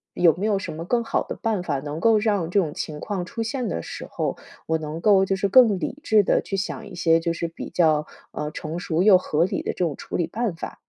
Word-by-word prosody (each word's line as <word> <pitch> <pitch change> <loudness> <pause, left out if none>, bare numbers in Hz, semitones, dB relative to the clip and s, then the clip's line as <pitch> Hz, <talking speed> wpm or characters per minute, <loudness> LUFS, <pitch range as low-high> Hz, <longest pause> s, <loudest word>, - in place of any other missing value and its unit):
有 170 -3 +5
没 190 +4 -3
有 205 -3 +2
什 195 - -5
么 160 +2 -6
更 235 +7 +1
好 - - 0
的 - - -7
办 215 -5 0
法， 145 -6 -1
能 145 +3 -5
够 225 -2 +5
让 205 -6 0
这 200 +3 +3
种 155 -5 -1
情 150 -1 -5
况 195 0 -3
出 225 +5 -5
现 230 +1 -2
的 85 - -2
时 - - -7
候， - - -2 0.3
我 160 - +1
能 155 0 -5
够 195 +1 +5
就 195 - 0
是 200 - +1
更 210 -2 +6
理 180 - -4
智 215 -1 +4
地 - - +2
去 195 - -4
想 210 +3 -4
一 195 - -11
些 165 -2 +3
就 170 - 0
是 170 0 -3
比 165 - -8
较， 155 -3 +2 0.3
呃， 150 0 -4
成 155 +2 -5
熟 170 -1 -1
又 195 -1 +7
合 165 -2 +1
理 185 - -2
的 - - -1
这 - - -13
种 155 -4 -2
处 - - -5
理 170 - 0
办 220 +1 -2
法。 165 - -8
180 Hz, 285 characters per minute, -24 LUFS, 160-210 Hz, 0.3 s, 又